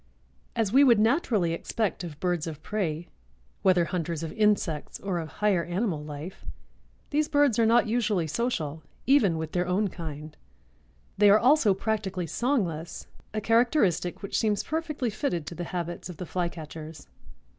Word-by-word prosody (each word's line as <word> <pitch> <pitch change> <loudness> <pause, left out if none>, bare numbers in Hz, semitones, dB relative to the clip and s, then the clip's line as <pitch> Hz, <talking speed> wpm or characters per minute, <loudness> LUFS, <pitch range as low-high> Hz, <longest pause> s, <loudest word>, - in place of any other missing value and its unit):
As 220 -2 0
we 275 +2 +7
would 240 -5 +6
naturally 220 - +2
expect 200 +3 -2
of 155 -4 -8
birds 175 -2 -1
of 155 -2 -7
prey, 175 -6 -2 0.5
whether 180 -2 +4
hunters 165 -2 -3
of 160 - -5
insects 205 -8 0
or 190 -3 -2
of 160 - -4
higher 200 -3 +1
animal 175 -3 -2
life, 150 +4 -8 0.7
these 300 +1 +2
birds 285 -6 +3
are 225 - +4
not 235 +2 +5
usually 220 -6 +1
social, 160 - -2 0.2
even 225 - +4
with 160 -1 -4
their 180 0 0
own 195 +3 +1
kind. 155 -3 -7 0.8
They 205 -1 +7
are 205 - +8
also 245 -4 +4
practically 195 -4 -2
songless, 175 - -2 0.3
a 215 - -2
characteristic 225 - +2
which 200 - -1
seems 210 -2 +1
perfectly 305 -7 -2
fitted 200 - -2
to - - -6
the 175 +1 -5
habits 175 0 -4
of 175 - -8
the 180 - -5
Flycatchers. 160 -3 -5
185 Hz, 155 wpm, -27 LUFS, 165-225 Hz, 0.8 s, are